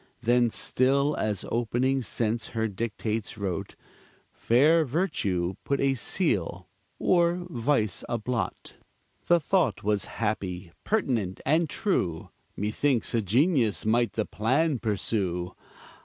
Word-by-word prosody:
Then 120 0 +3
still, 140 +6 +1
as 105 -3 -2
opening 120 +3 +1
sense 115 -1 -1
her 110 0 +1
dictates 110 +1 -3
wrote, 95 -4 -4 0.6
Fair 150 +8 +4
virtue 120 - -1
put 140 - 0
a 135 0 +2
seal, 95 - -1 0.3
or 175 0 +2
vice 115 - 0
a 120 - 0
blot. 120 +1 -4 0.5
The 175 0 +5
thought 160 - +1
was 105 -1 0
happy, 95 -5 -3
pertinent, 120 - 0
and 160 +1 +2
true; 95 - -1 0.3
Methinks 115 +4 0
a 115 - +2
genius 120 - +2
might 115 +2 +2
the 110 - -1
plan 130 - +1
pursue. 95 -5 -1
115 Hz, 115 wpm, -27 LUFS, 105-140 Hz, 0.6 s, The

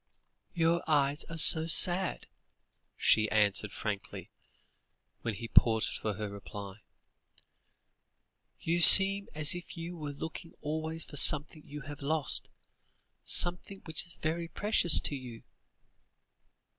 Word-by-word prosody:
"Your 170 0 -1
eyes 145 0 -1
are 165 - -10
so 160 +1 +4
sad," 180 +3 +1 0.7
she 110 -1 +1
answered 105 -1 0
frankly, 105 -2 -8 0.9
when 115 -3 -5
he 115 +4 -9
paused 110 -1 +1
for 105 -2 -5
her 105 0 -6
reply; 100 0 -11 1.8
"you 170 +1 -3
seem 195 +3 +8
as 155 -1 +1
if 175 0 -10
you 170 +1 -8
were 150 -3 -8
looking 160 +3 -10
always 160 +2 -6
for 145 - -11
something 150 +2 +3
you 150 +1 -10
have 145 +2 -12
lost, 150 +1 -3 0.7
something 180 +3 0
which 160 -2 -5
is 170 - -6
very 165 +2 -5
precious 185 -3 +2
to 145 - -3
you." 125 -4 -11
155 Hz, 120 wpm, -29 LUFS, 115-170 Hz, 1.8 s, seem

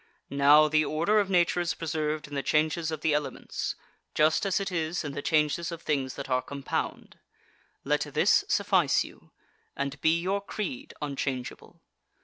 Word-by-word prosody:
Now, 145 +2 +6
the 155 0 +3
order 170 +8 +2
of 200 -2 0
Nature 175 -1 +3
is 175 -1 -1
preserved 155 -1 -2
in 145 - -12
the 140 - -1
changes 155 +3 +1
of 155 -1 -5
elements, 150 -2 -1 0.4
just 155 +7 +3
as 195 +1 +1
it 195 -1 -3
is 165 0 -1
in 145 - -4
the 145 +1 -5
changes 155 +3 +1
of 170 -1 -7
things 135 -4 -1
that 140 - -6
are 130 -1 +1
compound. 140 0 -5 0.6
Let - - +1
this - - +4
suffice - - +2
you, - - -14 0.5
and 140 0 -3
be 160 +1 +3
your 195 +3 -1
creed 255 +8 -5
unchangeable. 135 -3 -5
155 Hz, 160 wpm, -28 LUFS, 145-170 Hz, 0.6 s, Now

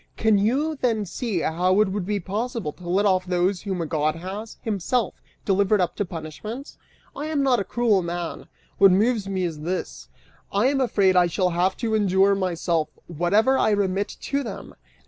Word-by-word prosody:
Can 220 -2 +3
you 275 +10 +1
then 225 -5 0
see 200 -1 -3
how 180 +5 +1
it 215 -2 +4
would 190 -1 -3
be 205 -1 0
possible 215 - -3
to 175 -1 -10
let 195 +4 +2
off 185 -2 +3
those 180 +1 0
whom 190 -4 -3
a - - -3
god 155 0 0
has, 195 +6 -7
himself, 220 +1 -1 0.2
delivered 200 +1 +3
up 180 - 0
to 205 - 0
punishment? 180 - -7 0.4
I 295 +2 -4
am 300 -3 0
not 255 -3 +3
a - - -1
cruel 215 -1 +2
man; 170 -1 -5 0.3
what 195 - +8
moves 205 +2 +2
me 190 -1 -1
is 165 -4 -3
this: 175 +5 -4 0.4
I 200 +4 +2
am 275 -1 +1
afraid 200 -7 +3
I 180 -1 +5
shall 180 +1 0
have 180 +3 +1
to 225 -2 -2
endure 200 -2 +3
myself 175 -4 -1 0.2
whatever 200 - +2
I - - +3
remit 200 -1 0
to 280 0 -1
them!" 260 - -7
195 Hz, 185 wpm, -24 LUFS, 180-220 Hz, 0.4 s, what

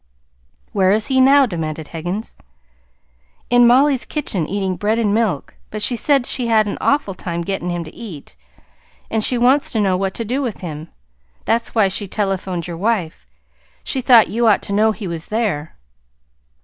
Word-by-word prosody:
"Where 190 -1 +2
is 215 0 +1
he 260 - +4
now?" 275 +1 +6
demanded 160 - -5
Higgins. 175 +7 -5 1.2
"In 245 -1 +6
Mollie's 265 +2 +4
kitchen 195 - -3
eating 195 -1 -2
bread 210 +5 0
and 215 -3 +1
milk; 215 -10 -1
but 215 0 -3
she 240 - +1
said 275 +1 +2
she 250 -2 0
had 220 -2 +3
an 205 - -4
awful 280 -9 +1
time 170 -2 -5
getting 185 -1 -3
him 175 -1 -3
to 155 - -12
eat. 175 - -10 0.8
And 220 -1 0
she 250 - +2
wants 260 +4 +3
to 225 - -1
know 195 -3 +2
what 190 +1 -2
to 230 - -4
do 255 +6 -1
with 240 -6 -4
him. 160 -2 -7 0.6
That's 230 +1 -1
why 215 -3 +4
she 195 +2 -1
telephoned 190 -3 -2
your 170 -2 -6
wife. 185 - -2 0.6
She 265 - -2
thought 240 -3 +6
you 230 +2 0
ought 210 - +3
to 200 - -4
know 215 +2 +3
he 210 -2 -6
was 170 -1 -5
there." 210 -9 -2
210 Hz, 180 wpm, -19 LUFS, 180-235 Hz, 1.2 s, now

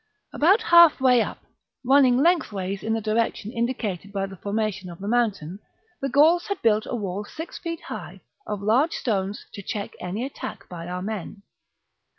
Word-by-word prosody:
About 385 +9 +4
half 340 -7 +7
way 250 -2 +5
up, - - -5 0.4
running 260 -1 +5
lengthways 205 - +1
in 220 - -1
the 225 - -1
direction 220 0 -1
indi 235 +2 -1
cated 200 -3 -5
by 195 -1 -1
the 195 0 -9
formation 200 -1 -3
of 170 - -9
the 200 - -7
mountain, 205 -7 0 0.4
the 275 - -1
Gauls 315 +6 +4
had 400 -2 -2
built 215 -1 +3
a - - -3
wall 200 -2 -3
six 320 +10 -8
feet 335 -1 -5
high, - - -8 0.3
of 205 -1 -4
large 250 +10 +3
stones, 200 -3 -2
to 200 - -7
check 200 +1 -4
any 195 +7 -3
attack 215 -7 -7
by 170 -1 -8
our 180 +1 -4
men. 205 -1 -6
220 Hz, 175 wpm, -24 LUFS, 195-265 Hz, 0.4 s, half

